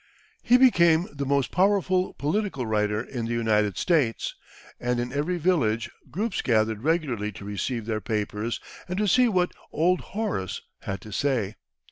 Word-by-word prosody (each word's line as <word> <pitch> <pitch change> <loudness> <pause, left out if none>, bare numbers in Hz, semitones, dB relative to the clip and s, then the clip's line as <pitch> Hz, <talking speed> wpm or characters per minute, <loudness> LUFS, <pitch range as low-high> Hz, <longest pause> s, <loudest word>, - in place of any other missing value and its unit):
He 245 - +5
became 175 -10 +5
the 140 -1 -3
most 140 -1 +1
powerful 185 -1 +2
political 155 - -1
writer 105 0 0
in 120 -3 -5
the 115 - -2
United 105 -4 +1
States, 150 -10 +1 0.5
and 125 0 0
in 120 +1 -3
every 155 +6 0
village 120 -10 +1 0.2
groups 210 +2 -2
gathered 110 -2 +1
regularly 135 -9 0
to 100 - -10
receive 105 +3 -3
their 110 -1 -2
papers 105 +1 -2 0.3
and 180 0 -3
to 210 0 +1
see 250 +6 +5
what 180 -5 +1 0.2
"Old 180 +4 +2 0.2
Horace" 195 - -2 0.2
had 95 -1 -5
to 110 - -10
say. 115 -4 0
130 Hz, 155 wpm, -26 LUFS, 110-180 Hz, 0.5 s, He